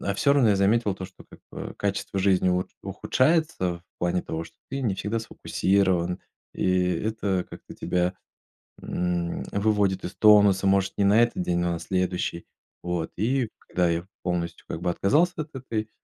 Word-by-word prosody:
А 100 - -1
всё 140 +7 +3
равно 135 -6 +4
я 100 - +3
заметил 100 +1 +2
то, 95 - -7
что, 95 0 -13
как - - -15
бы, - - -6
качество 100 - -2
жизни 95 -1 +3
ут 90 0 0
ухудшается 130 - +1
в - - -30 0.2
плане 90 +1 0
того, 80 +1 -4
что 80 - -16
ты 135 - -3
не 110 -7 0
всегда 105 +4 -2
сфокусирован, 95 -5 0 0.3
и 90 -1 +2
это 100 0 -1
как-то - - -11
тебя, 90 +1 0 0.7
м, 85 -1 -2
выводит 100 -2 +1
из 90 - -6
тонуса. 100 -2 +6
Может, 95 0 +2
не 100 - +3
на 105 +4 +5
этот 120 -5 0
день, 90 -1 0
но 85 0 0
на - - -3
следующий. 90 -2 -2 0.4
Вот 85 -2 -3
и 120 +3 0
когда 90 -1 0
я 85 +2 -2 0.2
полностью, 85 -2 -3
как - - -4
бы, 90 - +1
отказался 150 - +2
от 150 0 -14
этой, 110 -4 -4
95 Hz, 175 wpm, -26 LUFS, 90-110 Hz, 0.7 s, тонуса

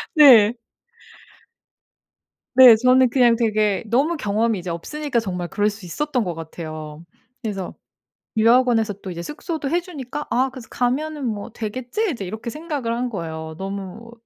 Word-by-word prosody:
네. 245 -7 +8 2.0
네 255 -2 +10
저는 255 +1 +4
그냥 240 -2 +4
되게 215 -3 +1
너무 280 +9 +1
경험이 215 -4 0
이제 175 0 -6
없으니까 265 - -2
정말 180 -5 -4
그럴 210 0 +1
수 205 -3 -10
있었던 260 - -1
것 175 -3 -4
같아요. 155 -1 -8 0.4
그래서 195 -5 -5 0.6
유학원에서 230 -1 +3
또 190 - -6
이제 170 0 -6
숙소도 300 - -5
해 345 +3 +2
주니까 295 -5 -7
아 260 +2 +1
그래서 255 -4 -11
'가면은 285 +3 -1
뭐 215 0 -4
되겠지?' 255 - -3
이제 205 -8 -5
이렇게 220 +5 -6
생각을 295 -6 -4
한 245 +1 -2
거예요. 160 -5 -6
너무 195 +4 -7
230 Hz, 310 characters per minute, -22 LUFS, 195-260 Hz, 2.0 s, 네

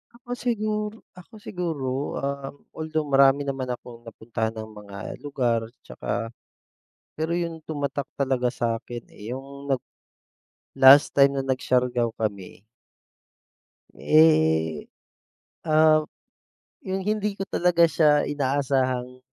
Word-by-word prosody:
Ako 245 0 -21
siguro 215 -2 -2 0.2
ako 220 +5 -16
siguro, 175 -9 -4 0.3
um 140 0 -4 0.2
although 155 0 -2
marami 135 +1 +5
naman 135 -2 -3
akong 120 -1 -8
napuntahan 110 0 -4
ng 110 0 -7
mga 100 -1 -11 0.3
lugar 125 -5 0 0.2
'tsaka 115 0 -4 0.9
Pero 160 +2 -2
yung 170 -2 -3
tumatak 145 -2 -3
talaga 130 -3 0
sa'kin 120 0 -3
eh, 110 +4 -9
yung 140 +1 -6
nag 130 - +1 1.0
last 140 +3 +7
time 140 0 +4
na 135 - -2
nag-Siargao 125 -2 0
kami. 100 -3 -4 1.3
Eh, 80 - +3 0.8
ah, 155 -1 +4 0.8
yung 190 0 -4
hindi 210 -1 -1
ko 195 - -3
talaga 175 -3 +3
siya 150 -2 +4
inaasahang 130 -3 -1
140 Hz, 110 wpm, -25 LUFS, 125-160 Hz, 1.3 s, last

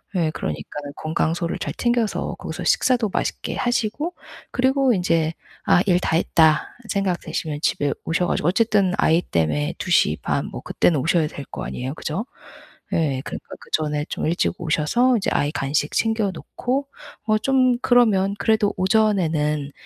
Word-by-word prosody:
네. 165 -3 +1
그러니까 75 - -5 0.2
건강소를 165 +2 -1
잘 - - -3
챙겨서 240 -3 0
거기서 - - -6
식사도 240 -5 +2
맛있게 - - -2
하시고 245 +7 -1 0.4
그리고 260 0 +2
인제 165 -4 +1 0.3
'아 175 - +5
일 180 -2 +3
다 160 - 0
했다.' 160 -2 +3
생각되시면 175 -6 -2
집에 145 -3 +1
오셔 180 +2 +1
가지고 150 - 0
어쨌든 200 -2 +2
아이 165 +2 +3
때문에 75 - -1
2 - - -5
시 - - +4
반 - - -1
뭐 - - -7
그때는 160 -5 +1
오셔야 160 +2 +2
될 140 -2 -8
거 - - -7
아니에요. 130 +3 -4
그죠? 160 +7 -4 0.7
예. 140 -5 +1
그러니까 - - -7
그 - - -16
전에 150 -1 0
좀 - - -3
일찍 170 +2 +1
오셔서 180 +11 +2
이제 195 - -1
아이 145 - +1
간식 145 +1 -1
챙겨 220 -3 +1
놓고 265 - -3 0.4
뭐 215 -1 +3
좀 255 +1 +3
그러면 210 -6 +3
그래도 215 -2 +2
오전에는 165 -8 +1
180 Hz, 325 characters per minute, -22 LUFS, 155-220 Hz, 0.7 s, 아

